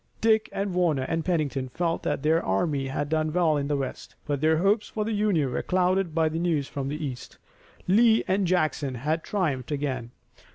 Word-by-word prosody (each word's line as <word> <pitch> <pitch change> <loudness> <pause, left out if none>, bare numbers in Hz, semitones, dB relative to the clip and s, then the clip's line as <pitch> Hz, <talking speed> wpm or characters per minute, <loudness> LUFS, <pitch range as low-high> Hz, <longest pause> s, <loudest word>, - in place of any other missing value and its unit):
Dick 220 -1 +3
and 195 -1 -2
Warner 170 -7 +1
and 165 +4 -2
Pennington 145 -7 -1
felt 165 +4 -1
that 145 -2 -2
their 160 +2 +3
army 135 - 0
had 145 +2 -2
done 155 0 0
well 165 -2 +2
in 140 -1 -1
the 145 -1 0
west, 135 -1 -6
but 145 -2 -2
their 160 0 +3
hopes 205 +5 +2
for 215 -1 -3
the 225 - -2
Union 200 -10 +1
were 125 - -1
clouded 185 -2 +1
by 160 -1 +3
the 160 +1 -2
news 160 -5 0
from 135 -1 -4
the 150 +2 -3
east. 125 -3 -7 0.5
Lee 225 +4 +5
and 190 0 +1
Jackson 155 -6 0
had 155 +6 -1
triumphed 155 -10 -2
again. 135 -5 -2
155 Hz, 200 wpm, -26 LUFS, 140-180 Hz, 0.5 s, Lee